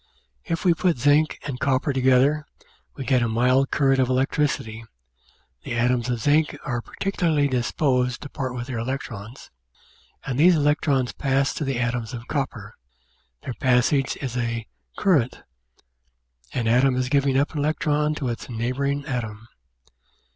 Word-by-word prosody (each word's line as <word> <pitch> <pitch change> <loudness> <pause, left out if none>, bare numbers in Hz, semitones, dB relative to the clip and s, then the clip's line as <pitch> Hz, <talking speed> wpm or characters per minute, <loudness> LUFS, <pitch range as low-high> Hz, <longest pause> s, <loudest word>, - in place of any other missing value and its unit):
If 165 +2 -3
we 175 - +6
put 170 -2 +1
zinc 145 +4 +3
and 135 -4 -4
copper 135 +1 +1
together 130 +3 +3 0.5
we 135 - -6
get 130 -2 +3
a 120 - +1
mild 125 +4 +2
current 135 -2 +2
of 130 - +3
elec 130 +1 +1
tricity; 115 -7 -1 0.8
the - - -4
atoms 120 0 +1
of 120 -2 -1
zinc 150 +5 +2
are 120 -3 -2
particularly 165 -4 0
disposed 125 -1 0
to 145 - -8
part 130 -3 -4
with 120 -1 -4
their 125 -3 -4
electrons, 115 -2 -6 0.7
and 135 0 -2
these 175 +3 +6
electrons 145 -3 +1
pass 135 0 0
to - - -3
the 135 -3 -1
atoms 120 -1 -2
of 120 +1 -9
copper; 120 -8 -3 0.7
their 125 - -4
passage 130 +1 +2
is 125 -3 -4
a 115 -2 -2 0.3
"current" 145 -11 +1 1.1
an 120 -3 -2
atom 125 +3 +4
is 130 0 0
giving 140 -1 +2
up 140 +2 +1
an 150 - -3
electron 150 0 0
to 140 - -3
its 120 +2 -5
neighbouring 135 +5 -2
atom. 115 -5 -4
130 Hz, 155 wpm, -24 LUFS, 120-145 Hz, 1.1 s, we